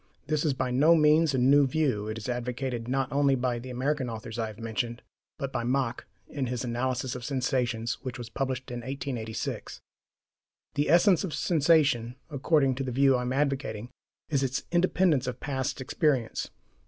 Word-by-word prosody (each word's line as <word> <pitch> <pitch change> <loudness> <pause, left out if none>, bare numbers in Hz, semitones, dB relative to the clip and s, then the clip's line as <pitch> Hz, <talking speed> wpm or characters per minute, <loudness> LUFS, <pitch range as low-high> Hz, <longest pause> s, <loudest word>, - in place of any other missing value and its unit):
This 155 -1 0
is 150 -5 +1
by 130 -1 -1
no 150 +7 +5
means 155 -1 +4
a - - +1
new 135 +3 +5
view; 130 -8 0
it 110 +1 -4
is 110 - -6
advocated, 125 -1 -3
not 135 +1 -1
only 140 -1 +3
by 125 -1 -1
the 130 +2 -9
American 130 +1 -1
authors 115 0 -6
I 110 - 0
have 110 -1 -9
mentioned, 115 +1 -3 0.3
but 135 -3 -4
by - - -1
Mach 125 -1 -1 0.2
in 135 -3 -3
his 125 0 -3
Analysis 125 +1 -1
of 125 - -6
Sensations, 125 -3 -1
which 130 -3 -5
was 120 -2 -7
published 130 +1 -3
in 120 - -4
1886. 120 -4 -4 0.9
The 145 0 0
essence 175 +3 +5
of 180 -6 -3
sensation, 145 -7 +2 0.2
according 140 -1 +2
to 135 - -1
the 130 - -3
view 135 +1 +4
I 125 - 0
am 125 0 -2
advocating, 135 -5 -1 0.4
is 140 -4 +1
its 135 0 -1
independence 175 -5 +2
of 125 0 -4
past 135 -2 -2
experience. 130 -2 0
130 Hz, 180 wpm, -28 LUFS, 120-145 Hz, 0.9 s, no